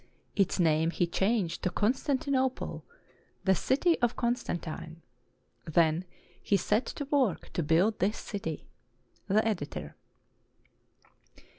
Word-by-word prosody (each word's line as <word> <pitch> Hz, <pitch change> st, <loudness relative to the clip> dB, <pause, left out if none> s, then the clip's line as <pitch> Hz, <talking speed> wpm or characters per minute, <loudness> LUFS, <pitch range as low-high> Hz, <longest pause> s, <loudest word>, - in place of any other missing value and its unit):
Its 195 Hz, -1 st, +1 dB
name 160 Hz, -1 st, +3 dB
he 175 Hz, -, +1 dB
changed 190 Hz, 0 st, 0 dB
to -, -, +1 dB
Constantinople, 260 Hz, -, 0 dB, 0.6 s
the 190 Hz, -, +4 dB
"city 320 Hz, -, +2 dB
of 240 Hz, 0 st, +2 dB
Constantine." 170 Hz, -9 st, -3 dB, 0.6 s
Then 160 Hz, +1 st, +2 dB, 0.4 s
he 200 Hz, -, +2 dB
set 210 Hz, +6 st, +1 dB
to 285 Hz, -, -4 dB
work 270 Hz, -, 0 dB
to -, -, 0 dB
build 170 Hz, +8 st, +2 dB
his 205 Hz, +4 st, +1 dB
city. 165 Hz, -8 st, -5 dB, 0.6 s
The 215 Hz, +3 st, +3 dB
Editor. 175 Hz, -10 st, -3 dB
195 Hz, 110 wpm, -30 LUFS, 170-240 Hz, 0.6 s, the